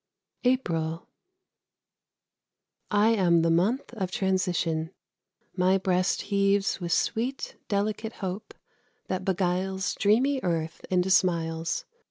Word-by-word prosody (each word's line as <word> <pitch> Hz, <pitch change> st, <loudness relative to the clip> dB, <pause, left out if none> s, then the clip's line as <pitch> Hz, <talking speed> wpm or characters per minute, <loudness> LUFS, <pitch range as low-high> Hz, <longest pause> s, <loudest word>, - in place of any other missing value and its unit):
APRIL. 165 Hz, -11 st, 0 dB, 1.8 s
I 210 Hz, +2 st, +4 dB
am 175 Hz, -7 st, +3 dB
the 165 Hz, -, +3 dB
month 210 Hz, +12 st, +1 dB
of 195 Hz, -6 st, -3 dB
transition. 180 Hz, -4 st, 0 dB, 0.7 s
My 185 Hz, +1 st, +3 dB
breast 185 Hz, -1 st, 0 dB
Heaves 200 Hz, 0 st, +1 dB
with 175 Hz, -1 st, -3 dB
sweet, 245 Hz, +9 st, -1 dB
delicate 215 Hz, +2 st, -1 dB
hope, 190 Hz, +1 st, -6 dB, 0.5 s
that 185 Hz, 0 st, -2 dB
beguiles 190 Hz, +1 st, 0 dB
Dreamy 255 Hz, +7 st, +2 dB
Earth 165 Hz, -2 st, -2 dB
into 185 Hz, 0 st, +1 dB
smiles. 165 Hz, -3 st, +1 dB
190 Hz, 100 wpm, -27 LUFS, 175-205 Hz, 1.8 s, I